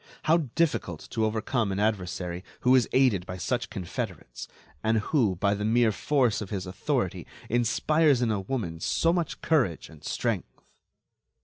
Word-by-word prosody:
How 160 +2 +4 0.2
difficult 165 -2 0
to 110 -2 +1
overcome 110 0 0
an 95 - -2
adversary 90 -4 -1 0.2
who 125 - +4
is 125 -4 +3
aided 125 -9 +3
by 90 - -5
such 120 +7 -2
confederates, 95 -6 -6 0.4
and 110 +1 +2
who, 110 -3 +1
by 100 +3 +1
the 105 0 -3
mere 115 +1 +3
force 125 0 +1
of 100 - -6
his 95 -3 -3
authority, 90 +1 -2 0.2
inspires 135 +5 +3
in 120 -2 +1
a 105 - 0
woman 95 -7 -3
so 165 - +2
much 175 -2 -2
courage 130 - +1
and 80 -2 -15
strength! - - -2
110 Hz, 155 wpm, -27 LUFS, 95-130 Hz, 0.4 s, How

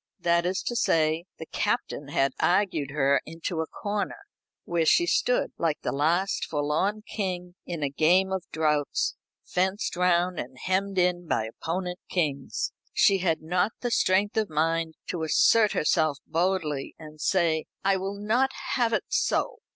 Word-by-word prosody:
That 170 0 +2
is 185 +1 -1
to 240 - -3
say, 160 -5 +2
the 160 - -7
Captain 205 - -2
had 140 -1 +1
argued 175 -7 +1
her 140 -1 +2
into 165 +1 -4
a 160 - -3
corner, 205 0 -3 0.5
where 170 -1 +1
she 345 - +5
stood, 250 -7 +1
like 160 -3 0
the - - -1
last 170 +8 +1
forlorn 160 +8 -1
king 180 -4 -3
in 170 -4 -4
a 140 - +1
game 180 +6 +3
of 190 -2 -2
draughts, 150 -3 0 0.3
fenced 190 +3 -1
round 180 0 +2
and 130 +1 -7
hemmed 190 +5 -1
in 175 -1 +1
by 110 - 0
opponent 180 +9 -4
kings. 145 -6 -1 0.2
She 195 -1 +4
had 165 -3 0
not 180 +5 +1
the 245 - -2
strength 205 +1 +2
of 215 -3 +1
mind 160 +1 0
to 175 - -3
assert 210 +7 +4
herself 155 -2 +2
boldly, 165 -4 -1
and 155 -1 -12
say: 165 -4 +1 0.2
"I 195 0 +3
will 195 +1 -4
not 235 +6 +2 0.2
have 235 -2 +1
it - - +1
so. - - 0
175 Hz, 160 wpm, -27 LUFS, 155-190 Hz, 0.5 s, she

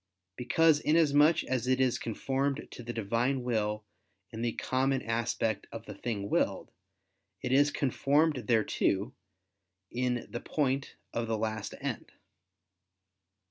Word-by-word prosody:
Because 155 +6 +3
inasmuch 155 0 +4
as 125 -1 -2
it 130 0 +2
is 130 -2 +2
conformed 135 +5 -2
to - - -9
the 120 0 -5
Divine 120 +4 0
will 105 -3 -1 0.5
in 110 - -6
the 120 -1 0
common 130 +1 0
aspect 115 -2 -1
of 115 0 -8
the - - -7
thing 105 -4 -4
willed, - - 0 0.7
it - - -2
is 145 +2 +5
conformed 145 0 +1
thereto 110 -1 +1 0.8
in 125 -1 -1
the 120 - -6
point 135 -2 -1 0.2
of 115 0 -2
the 110 -1 0
last 110 -1 -3
end. - - -5
125 Hz, 130 wpm, -30 LUFS, 115-140 Hz, 0.8 s, is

